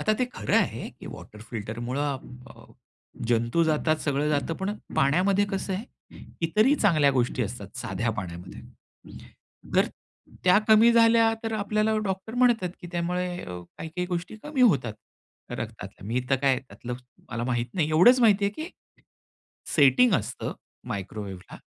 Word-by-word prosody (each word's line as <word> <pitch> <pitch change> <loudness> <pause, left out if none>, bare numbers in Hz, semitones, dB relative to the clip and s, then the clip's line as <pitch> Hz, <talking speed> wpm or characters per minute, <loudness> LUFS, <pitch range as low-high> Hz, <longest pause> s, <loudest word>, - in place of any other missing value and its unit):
आता 215 - +2
ते 255 - +3
खरं 105 - -2
आहे - - 0
की - - -9
वॉटर 105 - -11
फिल्टरमुळं 120 +6 -3 0.3
अ, - - -14 0.6
जंतू 120 +7 +2
जातात, 155 0 +2
सगळं 145 -1 -1
जातं. 150 +2 0
पण 190 +4 -3 0.2
पाण्यामध्ये 185 +8 +3
कसं 195 0 -2
आहे? 200 +5 -4 0.6
इतरही 215 - +4
चांगल्या 155 - +4
गोष्टी 125 -1 0
असतात 105 -2 -7
साध्या 110 +5 -2
पाण्यामध्ये. 90 -2 -7 1.2
तर - - +5 0.6
त्या 180 +1 +6
कमी 220 +2 +7
झाल्या 230 -1 +5
तर 225 -1 -3
आपल्याला 215 +1 +1
डॉक्टर 195 +3 -4
म्हणतात 240 -6 +3
की 180 - -8
त्यामुळे 180 +1 -1 0.2
अ, 90 0 -7 0.2
काही-काही 170 +3 -4
गोष्टी 180 +3 -4
कमी 295 -3 -3
होतात 135 - +3 0.6
रक्तातल्या. - - -7
मी 120 +4 0
तर 135 - +5
काय 135 +1 +2
आहे 130 - +1
त्यातलं 125 -1 -8 0.4
मला 120 -1 -3
माहीत 120 -1 0
नाही. 160 -5 +1
एवढंच 180 +12 +6
माहिती 210 -4 +5
आहे, 200 - +2
की 315 +9 -6 1.1
सेटिंग 150 - +6
असतं - - -2 0.4
मायक्रोवेव्हला. 100 -1 -6
160 Hz, 145 wpm, -26 LUFS, -, 1.2 s, कमी